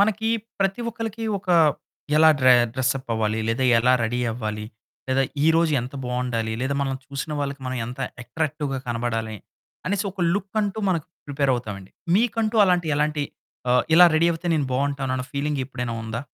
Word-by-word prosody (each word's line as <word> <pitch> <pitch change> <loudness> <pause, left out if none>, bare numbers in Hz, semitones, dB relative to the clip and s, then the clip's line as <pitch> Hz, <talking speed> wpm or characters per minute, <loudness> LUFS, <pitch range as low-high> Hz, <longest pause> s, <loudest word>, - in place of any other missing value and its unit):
మనకి 220 +2 +2 0.3
ప్రతి 195 +4 +1
ఒక్కరికి 225 0 -5
ఒక 190 -1 -19 0.7
ఎలా 160 +1 +7
డ్రె 130 0 +7 0.2
డ్రెస్ 130 -1 +1
అప్ 130 - -11
అవ్వాలి, 110 -1 0
లేదా 115 +3 0
ఎలా 125 +2 +4
రెడీ 120 +2 -1
అవ్వాలి, 110 -2 -4 0.4
లేదా 130 +1 +2 0.2
ఈరోజు 165 0 +4
ఎంత 125 +3 -7
బాగుండాలి, 125 -3 -2
లేదా 135 +2 -1
మనం 135 -1 -1
చూసిన 140 +2 -5
వాళ్ళకి 140 0 -3
మనం 130 0 -3
ఎంత 125 +2 -8 0.2
అట్రాక్టివ్‌గా 145 +1 -3
కనపడాలి 115 -2 -2 0.5
అనేసి 200 +2 0
ఒక 195 - -8
లుక్ 200 0 -4
అంటూ 205 +1 -2
మనం 175 -3 +1 0.3
ప్రిపేర్ 140 -1 0
అవుతామండి. 105 -6 -6 0.3
మీకంటూ 225 0 +1
అలాంటి 180 -2 +2
ఎలాంటి 150 0 0 0.5
ఆహ్, 125 0 +4
ఇలా 180 +1 +9
రెడీ 165 +2 +4
అవుతే 165 +2 -6
నేను 145 -3 0
బాగుంటాను 135 0 -1
అన్న 130 - -3
ఫీలింగ్ 145 0 -1
ఎప్పుడైనా 125 -3 -4
ఉందా? 110 +1 -4
140 Hz, 165 wpm, -24 LUFS, 125-170 Hz, 0.7 s, ఇలా